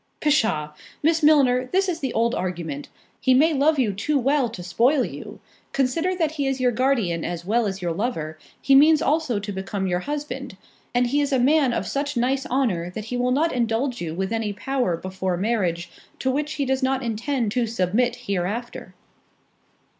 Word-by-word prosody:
"Pshaw! 220 - +1 0.3
Miss 325 +1 +3
Milner, 265 -5 +4
this 385 +1 +2
is 345 -3 -2
the 265 -5 -2
old 235 +1 +1
argument. 170 - -4 0.3
He 260 -1 +3
may 315 +5 +4
love 295 +2 +3
you 230 -7 +1
too 280 +10 0
well 270 -1 +2
to 190 -5 -8
spoil 245 - +2
you—consider 320 +8 -3
that 325 -4 0
he 285 -3 -2
is 270 -1 -1
your 250 -1 +3
guardian 225 -9 0
as 175 -1 -4
well 225 +3 +1
as 195 -1 -5
your 175 - 0
lover, 160 -7 -3 0.2
he 275 - +2
means 300 +3 +6
also 300 -6 +1
to 205 +1 -4
become 195 0 -3
your 180 -1 0
husband; 275 -2 -5 0.4
and 245 0 +3
he 285 +4 +1
is 285 - -1
a 265 - +3
man 275 +1 +3
of - - -2
such 285 -1 -2
nice 265 +3 0
honour, 220 -10 0
that 210 +4 -7
he - - 0
will 245 0 +1
not 300 +6 +1
indulge 240 +1 -1
you 165 -2 -4
with 190 +4 -2
any 220 -2 -1
power 245 -5 -1
before 185 0 -3
marriage, 180 -5 -1 0.3
to 260 - 0
which 295 +3 -2
he 280 - -1
does 265 +1 0
not 265 0 0
intend 230 0 -1
to 240 0 0
submit 230 +3 +1
hereafter." 200 +5 -3
245 Hz, 190 wpm, -23 LUFS, 195-275 Hz, 0.4 s, means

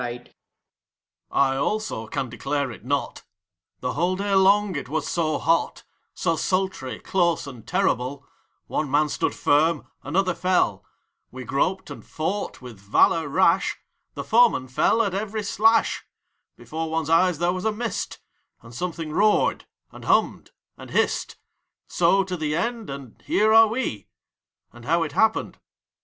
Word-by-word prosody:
FOURTH. 120 0 -6 1.0
I, 135 -1 +2
also, 140 - -2
ean 135 -2 -2
declare 135 +3 -2
it 105 - -12
not: 140 +3 -2 0.6
The - - -2
whole 175 +7 0
day 200 +1 -2
long 195 0 +4
it 140 -3 -5
was 155 0 -2
so 155 -3 0
hot, 165 0 0 0.3
So 165 -2 0
sultry, 185 -7 -2
close, 170 -4 0
and 125 -6 -11
terrible; 140 - -1 0.4
One 150 -2 -2
man 150 +2 +2
stood - - -1
firm, 155 +2 +2 0.2
another 185 +4 0
fell; 180 +1 +1 0.5
We 130 0 -8
groped 185 +10 -1
and - - -9
fought, 185 -2 -4
with 120 -5 -10
valor 125 +10 +3
rash, 185 +7 +2 0.4
The - - -4
f - - -21
oemen 225 - +4
fell 225 - +3
at 200 -4 -2
every 210 +2 -3
slash; 225 +3 +2 0.5
Before 160 0 -5
one's 160 -1 -2
eyes 180 0 +4
there 175 +2 +1
was 185 0 -4
a 220 - +2
mist, 230 +2 -4 0.5
And 115 0 -13
something 165 +1 -4
roared, 210 +6 +2 0.3
and - - -12
hummed, - - +1 0.3
and - - -10
hissed; - - 0 0.5
So 195 0 +2
to 185 -1 -4
the 155 -3 -2
end, 230 +5 -2
and 135 -4 -9
here 215 +1 +2
are 225 0 +8
we, 215 - -3 0.7
And 120 0 -14
how 165 +6 +2
it 155 - -4
happened, 220 0 +1
cannot - - -28
see. - - -54
165 Hz, 155 wpm, -24 LUFS, 140-195 Hz, 1.0 s, are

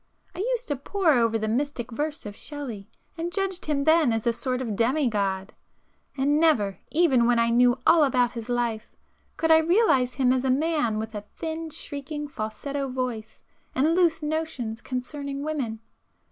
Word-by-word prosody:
I - - -9
used - - -1
to 290 - +1
pore 330 +4 +1
over 230 -3 +2
the 220 0 -2
mystic 245 +1 -2
verse 295 +4 -3
of 205 -1 -7
Shelley, 240 -10 -7 0.3
and 340 +1 -2
judged 385 -2 -2
him 285 -2 0
then 315 -4 +4
as 225 -1 -1
a 235 - +3
sort 255 +1 -2
of 230 -5 -3
demi 255 +6 +2
god;—and 210 +7 -3
never, 230 -12 +2
even 280 -8 +3
when 245 -1 +3
I 230 0 +3
knew 245 +1 +4
all 330 -2 +6
about 250 -3 +2
his 230 -1 -7
life, 235 -2 -2 0.4
could 325 0 +2
I 320 - +8
realize 320 - +3
him 255 -1 +3
as 260 -1 0
a 265 - 0
man 290 -5 +1
with 220 +1 -4
a 210 - -4
thin, 325 0 -4
shrieking 295 -1 -5
falsetto 275 +3 -4
voice 250 -4 -4 0.3
and 300 +5 +3
'loose' 340 -3 +2
notions 300 -8 -3
concerning 280 +2 -5
women. 270 -8 -3
265 Hz, 175 wpm, -26 LUFS, 235-310 Hz, 0.4 s, I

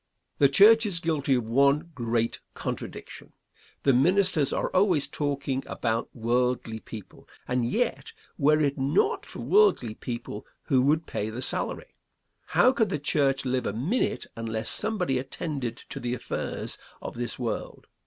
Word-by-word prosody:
The 140 - +6
church 220 +9 +7
is 180 -5 -1
guilty 150 -5 +1
of 120 -3 -1
one 140 +7 +3
great 115 -2 -1 0.2
contradiction. - - -6 0.5
The 135 - +4
ministers 180 +1 +3
are - - -1
always 185 -6 +3
talking 140 -2 -2
about 115 -1 -2
worldly 120 -1 0
people, 110 -2 -11 0.2
and 125 -2 0
yet, 245 - -1 0.2
were 150 0 +3
it 140 -2 0
not 160 - +1
for - - -8
worldly 400 - +3
people, 115 -3 -6 0.2
who 130 -2 +2
would 155 +4 +2
pay 105 - -3
the 120 +4 -5
salary? - - -2 0.6
How 255 - +7
could 230 -6 +1
the 150 - -1
church 140 -2 +1
live 130 0 0
a - - -2
minute 160 - -1
unless 110 -1 -2
somebody 180 -12 0
attended 135 -3 -4
to - - -5
the 120 0 -2
affairs - - -4 0.2
of - - -5
this 120 0 -4
world? 120 -3 -4
135 Hz, 150 wpm, -27 LUFS, 120-165 Hz, 0.6 s, church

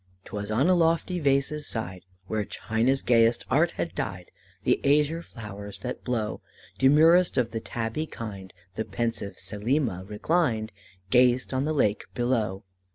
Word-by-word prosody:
"'Twas 105 0 -5
on 115 +8 +2
a 185 - +5
lofty 170 +1 +2
vase's 140 +1 +1
side, 95 -5 -5 0.2
Where 110 +2 -1
China's 115 +6 0
gayest 115 -1 +3
art 155 +6 +4
had 170 - -2
dyed 90 -1 -5 0.3
The - - +2
azure 150 +3 +3
flowers 105 - -8
that 125 - -5
blow, 115 -4 -2 0.4
Demurest 160 +5 +5
of 120 -2 +1
the 115 - -2
tabby 115 +7 -3
kind, 100 -7 -7 0.2
The 110 - -2
pensive 115 -3 -2
Selima 110 -2 -1
reclined, 110 -2 0 0.4
Gazed 125 +1 +4
on 130 +2 0
the 155 - 0
lake 105 -8 +1
below. 110 -5 0
120 Hz, 145 wpm, -27 LUFS, 110-145 Hz, 0.4 s, a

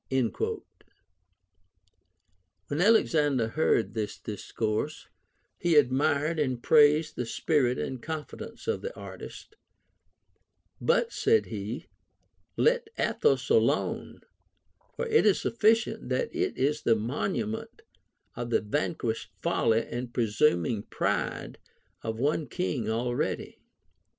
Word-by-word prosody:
Wlien 130 -5 0 2.1
Alexander 150 - +3
heard 135 -4 +1
this 110 -2 -3
discourse, 110 +6 -3 0.5
he 175 -2 +2
admired 145 +3 +3
and 130 -5 -1
praised 150 0 +5
the 125 - -3
spirit 130 -3 +1
and 130 -2 -4
confidence 160 -2 -7
of 455 - 0
the 485 +2 -6
artist; 425 - -10 0.6
" - - -41
But," 475 -1 +1
said 445 +1 +3
he, 105 +3 -5 0.4
" 90 -1 -44
let 485 -1 +2
Athos 455 - +1
alone; 460 - +1 0.7
for 480 - -2
it 455 -1 +4
is 205 - +5
sufiicient 225 0 +1
that 475 -6 -1
it 375 +2 -1
is 150 +3 +1
the 115 - +3
mon 120 - -2
ument 225 - -4 0.5
of 120 -1 -4
the - - +2
vanquished 115 0 -2
folly 115 0 +2
and 120 0 -5
presuming 110 - +1
pride - - -2 0.4
of 110 0 -4
one 145 +4 0
king 135 - -2
already. 120 +2 -2
145 Hz, 110 wpm, -28 LUFS, 115-185 Hz, 2.1 s, praised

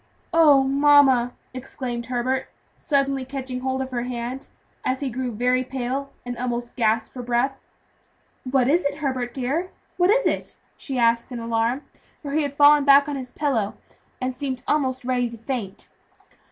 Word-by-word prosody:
"Oh! 300 -5 +6
mamma," 270 -3 +4 0.2
exclaimed 250 -2 -5
Herbert, 255 +1 -1 0.3
suddenly 275 -2 0
matching 260 -2 -4
hold 260 +1 -1
of 260 - -8
her 240 -1 -2
hand 245 +2 -5 0.4
and 255 - 0
he 270 -1 -3
grew 250 +1 -3
very 250 +3 +1
pale, 265 +2 -4
and 245 0 -4
almost 240 -1 -3
gasped 225 -1 +1
for 250 - -6
breath. 245 +3 0 0.9
"What 260 -2 +3
is 335 +6 +3
it, 285 - -1
Herbert 260 -5 -2
dear, 280 +8 -2 0.3
what 355 0 +3
is - - +3
it?" - - -1 0.2
she 270 -3 -5
asked 235 +1 +2
in 245 - -4
alarm; 230 +3 -1 0.4
for 285 - -5
he 310 +2 +1
had 285 -1 -4
fallen 290 0 +7
back 280 0 +6
on 290 - -3
his 260 -2 -6
pillow, 250 -10 -1 0.4
and 255 0 -2
seemed 260 -1 -4
almost 260 -4 0
ready 250 -1 0
to 230 - -10
faint. 225 -4 -5
260 Hz, 165 wpm, -23 LUFS, 245-280 Hz, 0.9 s, fallen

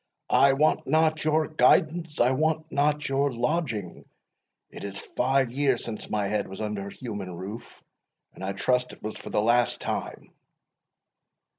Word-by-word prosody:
"I 140 0 +6
want 150 +3 +2
not 155 +2 +2
your 155 0 +2
guidance 160 0 +2
I 120 +2 +4
want 155 +3 0
not 150 +1 +1
your 140 +1 +1
lodging 120 - -2 0.7
it - - -9
is 100 -1 -5
five 130 +2 0
years 135 -1 +1
since 110 -2 -6
my 105 -1 0
head 105 0 -1
was 95 - -9
under 105 -2 -3
a - - -8
human 105 -7 -6
roof, 100 +6 -9 0.5
and - - -10
I 95 +1 -2
trust 125 +5 0
it - - -16
was 110 0 -4
for - - -9
the - - 0
last 120 +2 +3
time." - - -5
125 Hz, 160 wpm, -26 LUFS, 105-150 Hz, 0.7 s, I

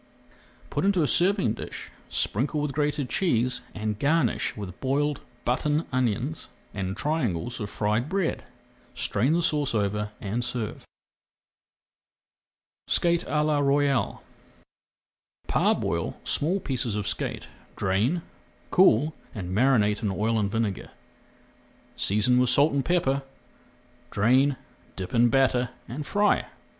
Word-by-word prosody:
Put - - -1
into 190 -4 +3
a - - +2
serving 180 - +2
dish, - - -8 0.2
sprinkle 135 +8 0
with 150 -1 -1
grated 145 -1 -1
cheese, 125 -9 0
and 105 -1 -3
garnish 145 -7 +1
with 100 -3 -7
boiled 145 +2 0 0.2
button 150 +6 +1
onions 130 +4 -1 0.2
and 95 -1 -3
triangles 120 - -1
of 105 -2 -4
fried 110 +6 -1
bread. 190 -3 -1 0.5
Strain 130 +10 +1
the 170 +1 +1
sauce 145 -6 0
over 105 0 0
and 110 +4 -2
serve. 120 -3 -4 2.0
SKATE 170 0 +2
À 150 -1 +1
LA 150 -1 +2
ROYALE 140 -1 +1 1.2
Parboil - - 0
small 175 +7 +1
pieces 125 - -2
of 105 -1 -2
skate, 105 -3 -3 0.3
drain, 115 - 0 0.5
cool, 160 -4 +5 0.2
and 90 -3 -4
marinate 105 -4 +3
in 105 - 0
oil 110 +3 0
and 100 -2 0
vinegar, 110 -2 -2 1.1
seasoning 110 +5 +2
with 125 -1 +3
salt 140 +4 +4
and 140 -1 +1
pepper. 140 -6 +1 0.9
Drain, 130 +6 +3 0.4
dip 95 -2 -6
in 120 0 +5
batter, 125 -1 +2 0.2
and 140 +4 -6
fry. 205 0 +2
125 Hz, 120 wpm, -26 LUFS, 105-150 Hz, 2.0 s, cool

